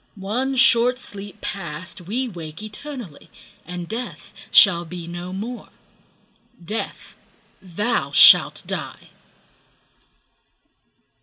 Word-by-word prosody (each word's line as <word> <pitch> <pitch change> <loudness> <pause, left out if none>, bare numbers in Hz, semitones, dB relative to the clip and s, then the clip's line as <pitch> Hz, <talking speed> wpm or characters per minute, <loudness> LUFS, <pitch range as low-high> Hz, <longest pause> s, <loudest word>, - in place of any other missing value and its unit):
One 235 +7 -2
short 250 -1 +4
sleep 205 -4 -11
past, 170 -2 -6
we 230 +9 -2
wake 165 -3 -8
eternally, 215 - -9 0.4
And 175 -1 -6
Death 235 +4 -7 0.2
shall 175 -5 +6
be 175 0 -8
no 175 +1 -6
more: 225 +6 -6 1.0
Death, 215 +6 -5 0.5
thou 205 +6 -1
shalt - - +7
die! - - -6
200 Hz, 90 wpm, -22 LUFS, 175-235 Hz, 1.0 s, shalt